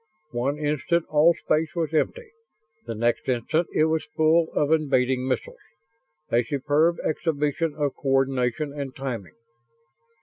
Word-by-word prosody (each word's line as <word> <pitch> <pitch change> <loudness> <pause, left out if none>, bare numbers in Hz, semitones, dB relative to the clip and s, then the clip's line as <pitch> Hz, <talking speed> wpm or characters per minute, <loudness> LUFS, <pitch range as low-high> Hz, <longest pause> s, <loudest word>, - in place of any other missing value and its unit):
One 130 +5 -1
instant 150 +3 0
all 155 +3 +5
space 155 -1 -1
was 165 -2 -2
empty. 460 - -1 0.6
The 115 - -4
next 120 +4 0
instant 130 +7 0
it 155 - +2
was 160 0 0
full 160 +1 +3
of 150 0 +1
invading 130 -4 +2
missiles 130 - -3 0.7
a 120 - +4
superb 150 +5 +1
exhibition 155 0 -1
of 145 -3 -1
coordination 135 0 0
and 140 -2 -6
timing. 120 -8 -5
145 Hz, 130 wpm, -25 LUFS, 130-160 Hz, 0.7 s, all